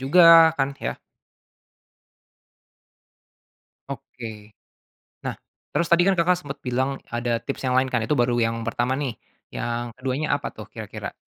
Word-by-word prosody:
juga, 165 +3 +8
kan, 135 0 0
ya? - - -2 2.9
Oke. 110 -3 -8 0.8
Nah, - - -2 0.3
terus 170 - 0
tadi 175 - +6
kan 195 -2 +3
Kakak 175 +1 +3
sempet 140 -3 -7
bilang, 130 +2 0 0.2
ada 120 0 0
tips 140 - -5
yang 125 0 +2
lain, 130 - +4
kan. 120 - +2
Itu 145 +6 0
baru 120 0 +2
yang 115 0 -1
pertama, 120 +3 0
nih. 140 -5 -2 0.4
Yang 120 0 -3
keduanya 130 +4 -2
apa 145 - -4
tuh, - - -10
kira-kira? - - -7
130 Hz, 140 wpm, -24 LUFS, 120-145 Hz, 2.9 s, juga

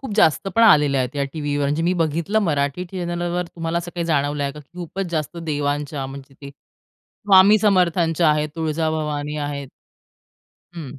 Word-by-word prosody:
खूप 265 -6 -6
जास्त 195 -1 +3
पण 230 - +4
आलेल्या 145 -10 +5
आहेत 130 +2 -3
या 140 - 0
टीव्हीवर. 145 -2 -2
म्हणजे 150 +3 0
मी 175 +2 +2
बघितलं 165 +6 0
मराठी 145 0 -1
चॅनेलवर 175 0 -2
तुम्हाला 165 0 -2
असं 175 0 -7
काही 170 - -2
जाणवलंय 145 -2 0
का? 150 - -10
खूपच 175 +5 -6
जास्त 155 0 -3
देवांच्या 145 -3 -2
म्हणजे 135 0 -11
ते 140 - -8
स्वामी 195 - +2
समर्थांच्या 175 -5 +2
आहेत, 150 0 0
तुळजाभवानी 155 -2 -2
आहेत. 145 -2 -4 1.1
हं. 145 -5 -8
155 Hz, 155 wpm, -21 LUFS, 145-175 Hz, 1.1 s, आलेल्या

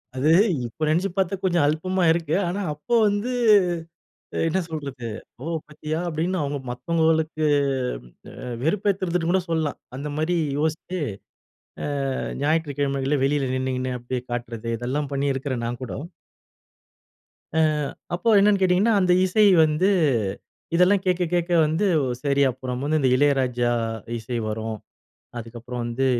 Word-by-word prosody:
அது 140 +4 +1 0.4
இப்ப 120 +7 -6
நெனச்சு 180 +5 +1
பார்த்தா 190 0 +1
கொஞ்சம் 175 -4 +2
அல்பமா 185 +4 0
இருக்கு. 160 -2 0
ஆனா 185 +4 -2
அப்போ 150 +11 -2
வந்து, 205 +5 -1 1.2
என்ன 190 +4 +1
சொல்றது? 140 -6 -6 0.4
"ஓ! - - -6 0.2
பார்த்தியா?" 155 +1 -4
அப்படீன்னு 170 +3 -1
அவங்க 145 0 -2
மத்தவங்களுக்கு, 160 +4 0 1.0
அ 125 - -6
வெறுப்பேத்துறதுன்னு 180 -1 0
கூட 190 +1 +3
சொல்லலாம். 160 -3 -1 0.2
அந்த 145 +2 -4
மாரி 165 +3 0 0.2
யோசிச்சு, 160 +4 -2 1.2
அ - - -3 0.2
ஞாயிற்றுக்கிழமைகள்ல 145 -3 0
வெளியில 135 -2 +1
நின்னுகின்னு 130 -1 -2
அப்படியே 120 +1 -4
காட்டுறது. 120 -1 -4
இதெல்லாம் 140 +4 -2
பண்ணியிருக்கிறேன் 135 -3 -1
நான் 120 +2 -5
கூடோ. 130 - -5 1.6
அ - - +3 0.6
அப்போ 230 +6 -1
என்னன்னு 200 -1 +4
கேட்டீங்கன்னா, 190 +5 +3
அந்த 180 -1 +3
இசை 210 +3 +3 0.2
வந்து, 155 +5 +2 0.9
இதெல்லாம் 185 +3 +4
கேட்க 180 -1 +2
கேட்க 175 0 0
வந்து 160 +7 0 0.4
சரி 140 0 +2
அப்புறம் 125 0 -5
வந்து 155 +1 +2
இந்த 130 - +3
இளையராஜா 130 -4 +2 0.5
இசை 120 +2 -4
வரும். 110 0 -4 0.6
அதுக்கப்புறம் 120 +1 -6
வந்து 120 +3 -1
150 Hz, 125 wpm, -24 LUFS, 130-175 Hz, 1.6 s, என்னன்னு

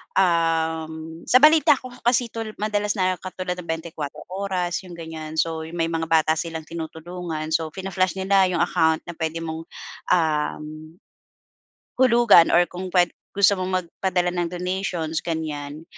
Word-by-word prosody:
um, 165 -3 +1 0.3
sa 255 +2 +5
balita 310 -1 +7
ko 255 -1 -10 0.2
kasi 240 -1 +2
'to, 225 -1 -4
madalas 210 -1 -1
na 185 -2 0
katulad 185 0 -5
ng 175 - -9
24 160 -3 -5
Oras, 185 -2 -2
yung 175 - -9
ganyan. 160 -2 -7
So, 160 0 -1
yung 165 - -9
may 165 -1 0
mga 165 0 -2
bata 160 -1 +3
silang 160 -1 -4
tinutulungan, 160 0 -6
so 160 0 +1
fina-flash 185 +2 -2
nila 190 0 +3
yung 175 -2 +1
account 160 -2 +2
na 175 - -7
puwede 165 0 -3
mong, 160 0 -6 0.4
um, 155 -1 -1 1.0
hulugan 240 -8 +6
or 175 +1 +4
kung 185 +1 -7
pwed 180 -1 +4 0.3
gusto 200 -1 +4
mong 185 0 -1
magpadala 180 +1 -1
ng 175 -1 -1
donations, 180 -2 -2
ganyan. 155 -2 -4
170 Hz, 150 wpm, -23 LUFS, 160-185 Hz, 1.0 s, balita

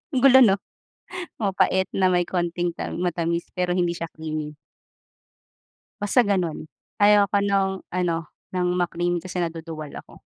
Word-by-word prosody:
Ang - - +3
gulo 265 -1 +8
no? 215 -7 +6 0.8
Mapait 190 -2 +2
na 190 -1 +3
may 180 -1 +2
konting 175 -1 -1
tam 170 - -5
matamis 170 -1 -1
pero 180 0 -1
hindi 175 -2 +1
siya 165 -1 -5
creamy. 155 -1 -5 1.4
Basta 205 +5 +3
ganun. 180 -7 -1 0.3
Ayaw 205 0 +6
ko 200 +1 +1
nong 195 -1 0
ano 170 -3 -1 0.2
ng 180 -1 +1
ma-cream 175 0 0
kasi 180 +1 -4
naduduwal 165 -2 -5
ako. - - -15
175 Hz, 140 wpm, -24 LUFS, 170-190 Hz, 1.4 s, gulo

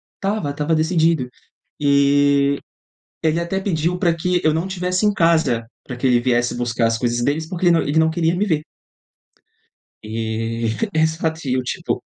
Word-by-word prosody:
Estava 195 -7 -2
estava 150 +3 0
decidido, 160 -4 +1 0.5
e 140 0 +3 0.7
ele 160 +1 +2
até 170 +3 -2
pediu 175 -2 -1
pra 170 -2 +2
que 180 +2 0
eu 155 -1 +3
não 165 +4 -1
tivesse 185 +1 -1
em 210 - +3
casa 160 - +2 0.2
pra 125 - -7
que 125 - -4
ele 125 -1 +4
viesse 120 0 0
buscar 120 -1 0
as 115 - 0
coisas 120 0 -1
deles, 155 +4 -1
porque 180 -1 -3
ele 175 - +6
não 165 - +3
ele 150 +3 +1
não 160 0 +3
queria 165 +1 0
me 200 +4 0
ver. 160 -7 0 1.4
E 115 +1 -3 0.3
exato 160 -1 0
e 125 - +1
eu, 130 - 0
tipo 125 - -3
155 Hz, 175 wpm, -20 LUFS, 125-170 Hz, 1.4 s, ele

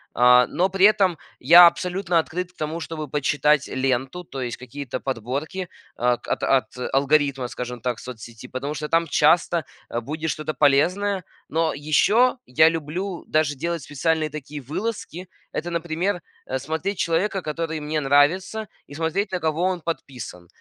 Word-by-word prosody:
А, 125 +1 +6
но 185 +9 0
при 190 +1 +4
этом 195 -5 +4 0.2
я 170 +7 +9
абсолютно 175 0 +2
открыт 180 +3 -3
к 180 - -40
тому, 155 +2 -3
чтобы 160 -2 -5
почитать 150 +1 +2
ленту, 130 +5 -1
то 135 -5 -7
есть 120 -2 -4
какие-то 130 0 -6
подборки, 135 - -4 0.3
о, 125 +1 +2
от 120 - -4
от 135 -1 +1 0.2
алгоритма, 140 -1 +2
скажем 125 -1 -6
так, 125 -1 -2
соцсети, 120 -1 -10
потому 140 +4 -4
что 150 +1 -4
там 165 0 +2
часто, 165 +2 +3 0.2
э, 120 - -2
будет 155 +6 -4
что-то 155 +1 -3
полезное. 180 +8 +2 0.3
Но 160 0 +1
ещё 205 - +3
я 155 +5 +5
люблю 165 +4 -4
даже 155 -2 +1
делать 170 +4 -3
специальные 155 +3 -1
такие 150 0 -7
вылазки. 185 - -5 0.2
Это, 175 - -4
например, 170 +3 -1 0.2
э, 130 - -3
смотреть 160 +7 -3
человека, 185 +4 0
который 160 0 -3
мне 150 +1 -2
нравится, 150 +10 +2 0.2
и - - -13
смотреть, 165 +6 -1
на 180 - -1
кого 160 +1 -1
он 185 -1 0
подписан. 125 - -6
155 Hz, 155 wpm, -23 LUFS, 135-175 Hz, 0.3 s, я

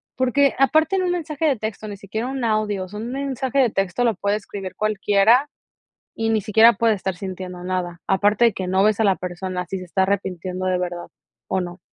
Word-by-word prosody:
porque 265 +2 +2
aparte 315 +7 +3
en 370 - +1
un 360 - 0
mensaje 320 -3 -2
de 270 -5 +2
texto, 215 0 -5
ni 200 -1 -7
siquiera 220 +5 -4
un 265 -1 -4
audio, 215 -3 0
o - - -12
sea 210 +2 -7
un 235 +3 -5
mensaje 270 -1 -3
de 245 -5 +4
texto 195 +5 -1
lo 235 -2 +3
puede 200 +2 0
escribir 195 -3 -7
cualquiera 215 +5 +3 0.7
y 225 0 -1
ni 220 -1 +2
siquiera 220 +3 +6
puede 225 +2 +2
estar 190 -1 -3
sintiendo 185 -1 -7
nada. 180 -1 -3
Aparte 205 +4 +3
de 230 - +3
que 185 -1 -4
no 190 +2 +2
ves 215 0 +2
a - - +3
la 195 -2 +4
persona, 180 0 -4
si 190 - -4
se 185 - -8
está 190 +2 -1
arrepintiendo 185 -1 -2
de 185 -1 +1
verdad 175 -1 -4 0.4
o 190 - 0
no. 175 +1 -7
205 Hz, 220 wpm, -22 LUFS, 185-235 Hz, 0.7 s, siquiera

